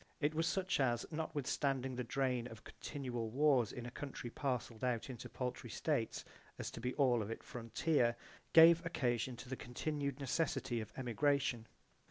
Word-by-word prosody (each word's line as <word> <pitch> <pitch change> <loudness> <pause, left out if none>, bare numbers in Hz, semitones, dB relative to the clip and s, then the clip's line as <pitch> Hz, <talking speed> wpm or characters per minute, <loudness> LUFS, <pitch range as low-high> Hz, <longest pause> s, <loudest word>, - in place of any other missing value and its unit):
It 150 0 +1
was 165 +1 +1
such 185 -2 +1
as, 120 -3 +2
notwithstanding 140 -4 -1
the 125 - -2
drain 125 0 0
of 115 -2 -11
continual 125 -6 -4
wars 130 -3 +3
in 120 - -6
a 120 - -6
country 130 -3 -6
parcelled 125 -5 -2
out 125 0 0
into 120 -2 -8
paltry 125 -1 -4
states - - -1 0.3
as - - -4
to - - -7
be 125 +1 -2
all 125 -5 +4
of 105 - -4
it 115 - -5
frontier, 120 +1 +1 0.4
gave 165 +1 +9
occasion 125 -6 0
to 125 - -10
the 130 - -3
continued 140 +3 -3
necessity 135 -4 0
of 110 - -8
emigration. 130 -1 +1
130 Hz, 165 wpm, -37 LUFS, 120-145 Hz, 0.4 s, gave